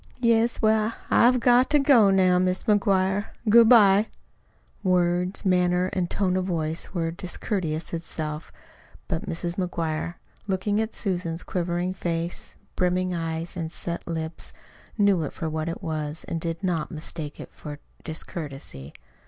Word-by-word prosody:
"Yes. 235 -1 +2
Well, 220 +1 +3 0.2
I've 250 +2 +5
got 245 +2 +4
to 295 - +5
go 270 -7 +6
in 195 - +4
now, 185 -1 +4
Mis' 185 0 0
McGuire. 200 -2 +2 0.2
Good 230 +1 +7
bye." 210 -3 +6 0.7
Words, 180 0 +1
manner, 180 0 +2
and 180 -3 -1
tone 185 -2 0
of 185 - -1
voice 165 -3 -2
were 165 -3 -1
discourtesy 175 -2 -3
itself; 155 -2 -5 0.6
but 175 +2 -3
Mrs. 170 0 -3
McGuire, 170 -2 -2 0.3
looking 205 +2 0
at 220 0 -4
Susan's 175 -4 -2
quivering 175 0 -2
face, 170 -2 -4 0.2
brimming 180 0 +1
eyes, 165 +1 -3
and 165 -2 -4
set 170 0 -4
lips, 160 -1 -5 0.4
knew 200 -4 +4
it 150 - -4
for 165 - -4
what 155 +1 -2
it 170 - -6
was 155 -2 -3
and 165 - -4
did 165 +2 -4
not 170 -5 -1
mistake 155 -2 -6
it - - -10
for 150 -1 -8 0.3
discourtesy. 145 - -7
180 Hz, 145 wpm, -25 LUFS, 165-195 Hz, 0.7 s, Good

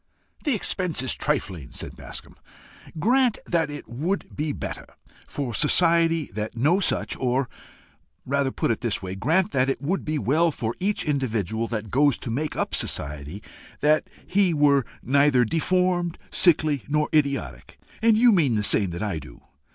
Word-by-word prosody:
"The 290 -5 +2
expense 180 - -1
is 130 - +2
trifling," 95 - -3
said - - -6
Bascombe. - - -10 0.6
"Grant 245 - +2
that 165 -3 0
it 145 0 -8
would 155 - -3
be 150 0 -2
better - - -6 0.4
for 135 -5 -4
society 165 +2 +3
that 110 +3 -5
no 155 +11 +3
such 200 - -1
or 130 +1 0 0.8
rather 140 0 0
put 130 - -1
it 115 - -2
this 115 -5 -2
way: 95 0 -4
grant 165 - +1
that 130 +1 +1
it 135 - -1
would 165 +8 -2
be 155 0 -2
well 155 +5 +2
for 115 -6 -3
each 200 +3 0
individual 115 - -1
that 110 -3 -5
goes 145 +1 +3
to 120 - -6
make 150 +6 -2
up - - -2
society 75 +7 -4 0.4
that 155 +1 +2 0.2
he 190 -3 +2
were 140 -3 +3 0.2
neither 140 -1 +3
deformed, 175 +4 0
sickly, 155 -6 +3
nor 150 +1 +1
idiotic, 140 - -1 0.2
and 225 -1 +4
you 240 +1 +6
mean 155 - +3
the 105 - 0
same 100 -2 +2
that 85 +3 -5
I 100 -7 -2
do. - - -14
145 Hz, 165 wpm, -24 LUFS, 115-165 Hz, 0.8 s, you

